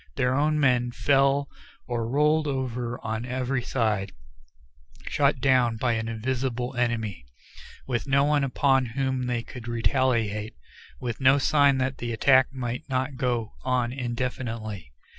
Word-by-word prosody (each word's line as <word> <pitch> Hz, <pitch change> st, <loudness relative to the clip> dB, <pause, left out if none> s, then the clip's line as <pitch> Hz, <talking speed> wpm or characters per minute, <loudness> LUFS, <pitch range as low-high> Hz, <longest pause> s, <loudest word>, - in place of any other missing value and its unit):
Their 125 Hz, 0 st, +1 dB
own 150 Hz, +3 st, +2 dB
men 125 Hz, -4 st, +3 dB
fell 140 Hz, +3 st, +2 dB, 0.4 s
or 115 Hz, -2 st, -2 dB
rolled 150 Hz, +3 st, +2 dB
over 125 Hz, -3 st, -3 dB
on 110 Hz, +1 st, -2 dB
every 130 Hz, +1 st, -2 dB
side, 110 Hz, -6 st, -1 dB, 0.9 s
shot -, -, +2 dB
down 125 Hz, -4 st, +3 dB
by 120 Hz, +1 st, +1 dB
an 110 Hz, 0 st, -2 dB
invisible 125 Hz, +2 st, -2 dB
enemy, 115 Hz, -, -1 dB, 0.6 s
with 125 Hz, +1 st, -2 dB
no 140 Hz, +1 st, +3 dB
one 145 Hz, 0 st, +2 dB
upon 135 Hz, -1 st, +2 dB
whom 130 Hz, -2 st, 0 dB
they 120 Hz, -2 st, -1 dB
could 120 Hz, -1 st, -10 dB
retaliate, 115 Hz, -3 st, 0 dB, 0.4 s
with 120 Hz, 0 st, -4 dB
no 135 Hz, +1 st, +6 dB
sign 140 Hz, -1 st, +4 dB
that 130 Hz, 0 st, -2 dB
the 120 Hz, -1 st, -3 dB
attack 130 Hz, +3 st, +4 dB
might 125 Hz, +2 st, -5 dB
not 130 Hz, +1 st, -1 dB
go 120 Hz, -4 st, -1 dB
on 125 Hz, -2 st, 0 dB
indefinitely. 120 Hz, -, -4 dB
125 Hz, 140 wpm, -26 LUFS, 115-135 Hz, 0.9 s, no